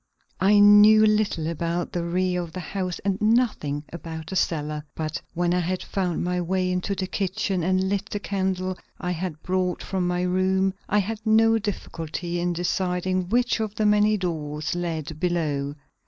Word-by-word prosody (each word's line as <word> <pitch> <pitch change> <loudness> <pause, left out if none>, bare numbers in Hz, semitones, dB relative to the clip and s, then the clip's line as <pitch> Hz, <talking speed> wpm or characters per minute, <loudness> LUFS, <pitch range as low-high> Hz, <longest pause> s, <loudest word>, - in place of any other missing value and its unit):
I 200 +3 +5
knew 205 +1 +8
little 210 -6 +1
about 170 +1 -2
the 175 - -2
rear 180 +1 0
of 165 -2 -8
the 185 - -5
house 185 +1 -3
and 200 +1 0
nothing 215 - +1
about 160 -2 -7
the - - -3
cellar. 150 -4 -1
But 155 -1 -3
when 175 0 +1
I 180 - +2
had 180 +1 -2
found 185 -4 -2
my 180 0 0
way 185 +1 0
into 180 +2 -1
the 190 - -2
kitchen 195 0 -1
and 185 +2 +1
lit 200 +1 -2
the 205 - -3
candle 185 -1 -2 0.2
I 180 - -2
had 170 -3 -4
brought 185 -1 -1
from 185 -2 -1
my 180 0 0
room, 190 +1 +1 0.2
I 210 - +2
had 210 +2 -1
no 225 +1 +4
difficulty 175 -4 -4
in 175 +1 0
deciding 180 +1 -1
which 245 +2 +2
of 215 -1 -3
the 215 - 0
many 210 +1 +4
doors 155 -4 -3
led 160 -3 -4
below. 150 -5 -1
180 Hz, 175 wpm, -25 LUFS, 170-200 Hz, 0.2 s, knew